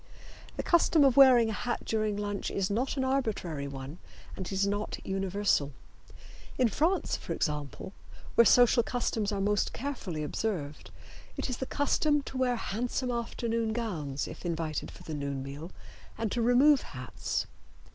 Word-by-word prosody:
The - - -2
custom 335 -3 +4
of 270 -3 +5
wearing 250 -5 +7
a - - -3
hat 240 +3 -3
during 215 -2 0
lunch 205 -1 -3
is 195 0 -1
not 255 +7 -1
an 265 - +1
arbitrary 215 - -1
one, 135 +3 -8 0.4
and 190 - -5
it - - -6
is 195 +1 +1
not 205 +1 -2
universal. 190 -6 0 0.8
In 250 -3 +3
France, 330 - +1
for - - -5
example, 150 - -3 0.4
where 235 - +7
social 245 +1 +6
customs 225 -3 -1
are 200 - -2
most 205 +1 +1
carefully 215 - -4
observed, 150 -4 -3 0.5
it - - -2
is 245 - -3
the 265 - -4
custom 290 0 +1
to 265 - -7
wear 250 -1 +2
handsome 245 +3 -2
afternoon 230 -1 -2
gowns 160 - -3
if - - -9
invited 165 -3 -2
for - - -13
the 160 - -6
noon 140 -2 -3
meal 140 +5 -7 0.5
and 225 -3 -2
to 240 - 0
remove 260 +4 +5
hats. 125 -2 -4
215 Hz, 160 wpm, -30 LUFS, 165-245 Hz, 0.8 s, wearing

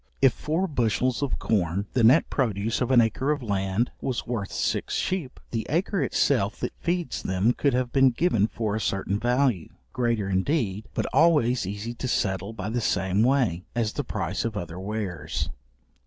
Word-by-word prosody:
If 135 -3 +5
four 160 +8 -1
bushels 125 - 0
of 140 -2 -1
corn, 95 -2 0
the 125 - +2
net 125 +8 +6
produce 115 -3 0
of 125 - +1
an 125 -2 +6
acre 115 +5 0
of 145 -3 0
land, 100 +2 0
was 130 -3 -2
worth 115 -5 -3
six - - -1
sheep, 180 -9 -2
the 115 -2 -2
acre 180 +7 0
itself - - +1
that - - -2
feeds 175 -4 -2
them 95 +6 +1
could 140 -1 +1
have 125 -1 0
been 135 -1 +6
given 120 - +2
for 110 -2 -2
a 110 - -2
certain 95 +1 -1
value, 120 - +1 0.2
greater 115 -5 0
indeed, 100 +1 0
but - - 0
always 130 - +3
easy 105 +4 -4
to 130 - -5
settle 100 -3 -1
by 110 -2 -5
the 120 +1 -1
same 95 0 +1
way, 120 -9 +2
as 115 -3 0
the - - -2
price 95 -2 -3
of 115 -2 -3
other 85 -1 -5
wares. 95 -6 -3
115 Hz, 180 wpm, -26 LUFS, 100-130 Hz, 0.2 s, net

